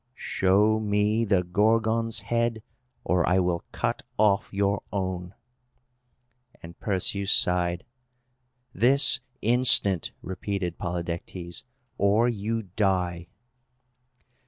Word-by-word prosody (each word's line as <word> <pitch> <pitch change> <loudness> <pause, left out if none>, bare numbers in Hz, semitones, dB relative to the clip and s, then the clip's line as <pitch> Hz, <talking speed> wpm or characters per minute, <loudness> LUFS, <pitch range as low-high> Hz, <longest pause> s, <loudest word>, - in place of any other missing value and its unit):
"Show 105 +2 +1
me 105 +1 0
the 100 -4 +1
Gorgon's 110 +4 0
head, 115 +1 -2 0.4
or 90 -1 +1
I 90 - +2
will 90 -2 0
cut - - -3 0.2
off 105 -1 +1
your 100 0 -1
own!" 95 -2 -4 1.3
And 85 0 -12
Perseus 100 0 -1
sighed. 90 -1 +1 0.9
"This 135 +4 +5 0.2
instant," 115 -6 +4
repeated 95 -1 -5
Polydectes, 85 0 -6 0.3
"or 105 +4 +3
you 115 0 -3
die!" 90 -3 -2
100 Hz, 90 wpm, -25 LUFS, 90-110 Hz, 1.3 s, This